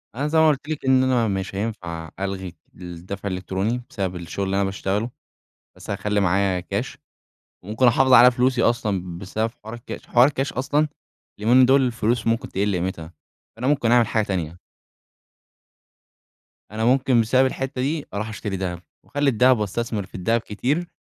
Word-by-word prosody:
أنا 145 Hz, +3 st, -1 dB
زي 160 Hz, +1 st, +1 dB
ما 160 Hz, -, +6 dB
قُلت 145 Hz, +1 st, -2 dB
لِك 150 Hz, -3 st, -4 dB
إن 130 Hz, 0 st, +4 dB
أنا 125 Hz, -3 st, +2 dB
مش 95 Hz, -1 st, -3 dB
هينفع 85 Hz, -7 st, -4 dB
ألغي 95 Hz, -2 st, -4 dB, 0.2 s
الدفع 90 Hz, +3 st, -7 dB
الإلكتروني 95 Hz, +6 st, -2 dB
بسبب 95 Hz, -3 st, -3 dB
الشغل 90 Hz, +3 st, -4 dB
اللي 95 Hz, +1 st, -1 dB
أنا 100 Hz, -, +2 dB
باشتغله، 95 Hz, +4 st, -2 dB, 0.7 s
بس -, -, -10 dB
هاخلي 105 Hz, +1 st, -1 dB
معايا 95 Hz, -1 st, +1 dB
كاش 100 Hz, +7 st, -4 dB, 0.7 s
وممكن 110 Hz, +6 st, +1 dB
أحافظ 130 Hz, +2 st, +4 dB
على 125 Hz, 0 st, +9 dB
فلوسي 125 Hz, +1 st, +1 dB
أصلًا 95 Hz, -7 st, -1 dB
بسبب 110 Hz, +5 st, -3 dB
حوار 110 Hz, +2 st, -8 dB
الكاش. 120 Hz, +3 st, -9 dB
حوار 125 Hz, +2 st, +5 dB
الكاش 135 Hz, -2 st, -2 dB
أصلًا 145 Hz, +4 st, +1 dB, 0.5 s
اليومين 125 Hz, +4 st, +5 dB
دول 135 Hz, +1 st, +5 dB
الفلوس 115 Hz, -2 st, 0 dB
ممكن 115 Hz, 0 st, 0 dB
تقل 100 Hz, +2 st, 0 dB
قيمتها، 85 Hz, -2 st, -4 dB, 0.4 s
فأنا 125 Hz, +3 st, -3 dB
ممكن 135 Hz, -5 st, +2 dB
أعمل 120 Hz, -2 st, +5 dB
حاجة 110 Hz, -1 st, +1 dB
تانية. 85 Hz, -3 st, -3 dB, 2.1 s
أنا 110 Hz, +1 st, -2 dB
ممكن 130 Hz, -1 st, +3 dB
بسبب 130 Hz, +4 st, +3 dB
الحتَّة 130 Hz, 0 st, -3 dB
دي 150 Hz, +3 st, -1 dB
أروح 110 Hz, +2 st, -3 dB
أشتري 105 Hz, -2 st, -4 dB
دهب، 90 Hz, -2 st, -3 dB, 0.2 s
وأخلي 145 Hz, 0 st, 0 dB
الدهب 125 Hz, 0 st, +4 dB
وأستثمر 105 Hz, 0 st, -2 dB
في -, -, -16 dB
الدهب 115 Hz, +5 st, 0 dB
كتير. 140 Hz, +12 st, -2 dB
110 Hz, 165 wpm, -23 LUFS, 95-130 Hz, 2.1 s, على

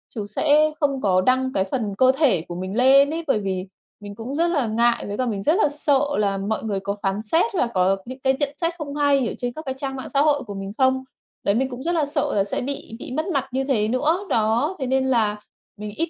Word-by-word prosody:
chứ 210 Hz, -3 st, -3 dB
sẽ 305 Hz, +6 st, +3 dB
không 280 Hz, -4 st, 0 dB
có 185 Hz, -2 st, +3 dB
đăng 260 Hz, +5 st, +1 dB
cái 190 Hz, -, +1 dB
phần 220 Hz, -6 st, -1 dB
cơ 260 Hz, +2 st, +6 dB
thể 275 Hz, -, +3 dB
của 175 Hz, -, -6 dB
mình 185 Hz, +2 st, -5 dB
lên 270 Hz, +3 st, +6 dB
ấy, 335 Hz, +1 st, -3 dB
bởi 270 Hz, -, +2 dB
vì 190 Hz, -2 st, -3 dB, 0.3 s
mình 205 Hz, -1 st, -9 dB
cũng 235 Hz, +6 st, -6 dB
rất 335 Hz, +3 st, +2 dB
là 295 Hz, -8 st, 0 dB
ngại 235 Hz, +2 st, +1 dB
với 205 Hz, 0 st, -4 dB
cả 255 Hz, -, 0 dB
mình 210 Hz, -5 st, -2 dB
rất 300 Hz, -, +3 dB
là 430 Hz, -, +3 dB
sợ 290 Hz, -1 st, +2 dB, 0.2 s
là 200 Hz, -2 st, +1 dB
mọi 205 Hz, +3 st, -2 dB
người 205 Hz, -3 st, -2 dB
có 200 Hz, +1 st, -3 dB
phán 195 Hz, +1 st, 0 dB
xét 225 Hz, +11 st, +2 dB
và 340 Hz, -10 st, +1 dB
có 190 Hz, +1 st, +2 dB
những 255 Hz, +2 st, -8 dB
cái 265 Hz, 0 st, +2 dB
nhận 285 Hz, -2 st, +1 dB
xét 335 Hz, 0 st, 0 dB
không 290 Hz, -3 st, -6 dB
hay 285 Hz, -3 st, +2 dB
ở -, -, -3 dB
trên 245 Hz, -1 st, -3 dB
các 310 Hz, -, -7 dB
cái 265 Hz, -, -2 dB
trang 270 Hz, 0 st, -4 dB
mạng 260 Hz, -, -6 dB
xã 280 Hz, -, +2 dB
hội 290 Hz, -1 st, +2 dB
của 210 Hz, -4 st, -8 dB
mình 195 Hz, 0 st, -6 dB
không. 260 Hz, 0 st, +2 dB, 0.4 s
Đấy 200 Hz, -, +2 dB
mình 260 Hz, +3 st, 0 dB
cũng 250 Hz, 0 st, -7 dB
rất 345 Hz, +2 st, 0 dB
là 315 Hz, -3 st, +2 dB
sợ 290 Hz, -, -1 dB
là 200 Hz, -, +3 dB
sẽ 200 Hz, -, -3 dB
bị 275 Hz, -3 st, -5 dB
bị -, -, -8 dB
mất 315 Hz, +6 st, -2 dB
mặt 275 Hz, -2 st, 0 dB
như 265 Hz, +2 st, -1 dB
thế 245 Hz, -6 st, +1 dB
nữa, 295 Hz, +8 st, +1 dB
đó, 230 Hz, -, +1 dB
thế 265 Hz, -, -2 dB
nên 265 Hz, +1 st, +1 dB
là 215 Hz, -5 st, +1 dB, 0.4 s
mình 210 Hz, 0 st, -6 dB
ít 330 Hz, +1 st, -1 dB
255 Hz, 270 wpm, -23 LUFS, 210-285 Hz, 0.4 s, cơ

